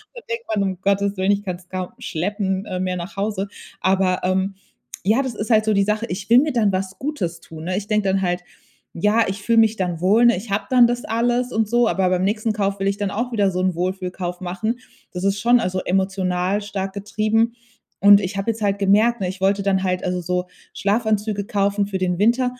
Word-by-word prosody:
Da 480 - -8
denkt 465 0 -4
man: 205 -2 +1
„Um 190 -1 -3
Gottes 200 0 +1
Willen, 190 +2 +2
ich 205 0 0
kann's 180 -1 -6
kaum 185 -1 -4
schleppen 190 +2 -2 0.2
mehr 185 -1 -1
nach 175 +2 -7
Hause.“ 200 0 -2 0.3
Aber, 190 0 +1
ähm, 190 +1 0 0.5
ja, 220 +6 +3
das 260 -4 -4
ist 210 +3 -4
halt 215 -1 +4
so 215 - +2
die 200 - +3
Sache, 210 +3 0
ich 195 +2 -5
will 240 - +8
mir 300 +1 0
dann 220 -4 +2
was 190 0 -3
Gutes 180 - -3
tun, 160 0 -10
ne? 185 +1 -1
Ich 205 +1 -4
denke 210 -2 +1
dann 190 0 +1
halt, 180 -1 -1 0.5
ja, 210 +6 +2
ich 195 +1 -4
fühle 230 -1 +2
mich 220 -1 +5
dann 180 -5 -2
wohl, 210 +6 +4
ne? 235 -5 +5
Ich 210 +3 -8
habe 200 - 0
dann 245 -2 +6
das 245 0 -2
alles 240 +2 0
und 220 -1 +1
so, 240 0 +3
aber 190 -1 +1
beim 185 0 +1
nächsten 215 +2 0
Kauf 200 -1 -1
will 195 - 0
ich 200 - +1
dann 200 -1 -2
auch 240 +3 -3
wieder 200 -3 +2
so 180 - -2
'n 185 -2 0
Wohlfühlkauf 180 0 -3
machen. 215 +7 -3 0.3
Das 180 +1 -4
ist 195 +1 +1
schon 240 +2 +5
also 185 -4 -1
emotional 190 +1 0
stark 195 -2 -4
getrieben. 215 +3 0 0.5
Und 200 0 +7
ich 195 +1 -4
habe 195 +4 0
jetzt 220 0 -8
halt 200 0 0
gemerkt, 215 +5 +3
ne, 185 - 0
ich 190 +1 -8
wollte 200 +1 +2
dann 190 -1 +1
halt 185 -1 -1
also 180 0 -1
so 180 +1 -1 0.3
Schlafanzüge 210 -1 0
kaufen 200 0 0
für 195 -1 -3
den 180 -2 -1
Winter- 240 +5 +3
200 Hz, 230 wpm, -21 LUFS, 185-220 Hz, 0.5 s, will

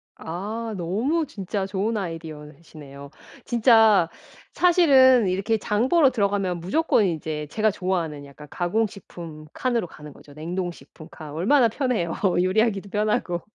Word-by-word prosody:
아 215 +7 -5
너무 230 - -1
진짜 195 -4 -4
좋은 200 +3 -2
아이디어시네요. 155 -4 -9 0.4
진짜 225 -7 +4 0.4
사실은 265 - +5
이렇게 195 +5 0
장 215 +3 -1
보러 300 -5 +4
들어가면 200 -5 -1
무조건 215 - +1
이제 155 -3 -3
제가 215 +2 +1
좋아하는 170 -7 -3
약간 145 +1 -13
가공식품 175 -5 -4
칸으로 240 -7 -1
가는 150 -2 -12
거죠. 145 - -17
냉동식품 165 -1 -6
칸 155 -3 -10
얼마나 230 - +3
편해요. 225 - -1 0.3
요리하기도 200 +1 0
편하고. 210 -5 -1
190 Hz, 320 characters per minute, -24 LUFS, 165-225 Hz, 0.4 s, 사실은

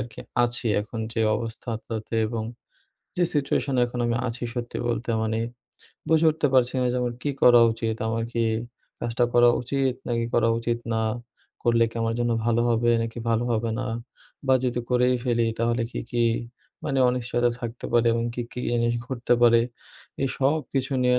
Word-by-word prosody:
আর 105 - -3
কি - - -9 0.2
আছি 120 0 -2
এখন 110 +2 -7
যে 115 - -1 0.2
অবস্থাটাতে 115 -1 -5
এবং 110 0 -3 0.8
যে 180 - +3
সিচুয়েশনে 140 -2 +1
এখন 120 0 -6
আমি 115 - +1
আছি 120 +1 -5
সত্যি 120 -1 -4
বলতে। 120 0 -2
মানে 110 0 -1 0.7
বুঝে 160 0 +4
উঠতে 155 -1 0
পারছি 125 -1 +3
না 125 - +2
যে 125 - -1
আমার 120 -1 -2
কী 145 - 0
করা 120 -1 +8
উচিত? 115 -1 -2
আমার 115 0 -1
কি 115 - 0 0.6
কাজটা 120 +1 +1
করা 120 0 +6
উচিত 135 +1 0 0.2
নাকি 115 -1 0
করা 115 -1 +4
উচিত 115 0 -1
না? 110 - +1 0.6
করলে 115 -1 +4
কি 115 - -10
আমার 115 0 0
জন্য 120 0 +1
ভালো 120 0 +2
হবে 120 +1 +2
নাকি 115 +1 -5
ভালো 115 +1 +2
হবে 115 0 0
না? 130 - -3 0.6
বা 130 - +5
যদি 125 -1 0
করেই 125 0 +3
ফেলি 120 -2 +2
তাহলে 115 +1 +1
কী, - - -4
কী 120 -1 +1 0.6
মানে 135 - 0
অনিশ্চয়তা 120 -1 +1
থাকতে 120 0 -6
পারে 120 0 +4
এবং 115 0 0
কী, 120 - -2
কী 125 - -5
জিনিস 120 0 +1
ঘটতে 125 -2 -1
পারে। 115 -1 +6 0.6
এই 135 - +1
সব 140 +4 +3
কিছু 135 0 -1
নিয়ে 125 0 +4
120 Hz, 180 wpm, -25 LUFS, 115-125 Hz, 0.8 s, করা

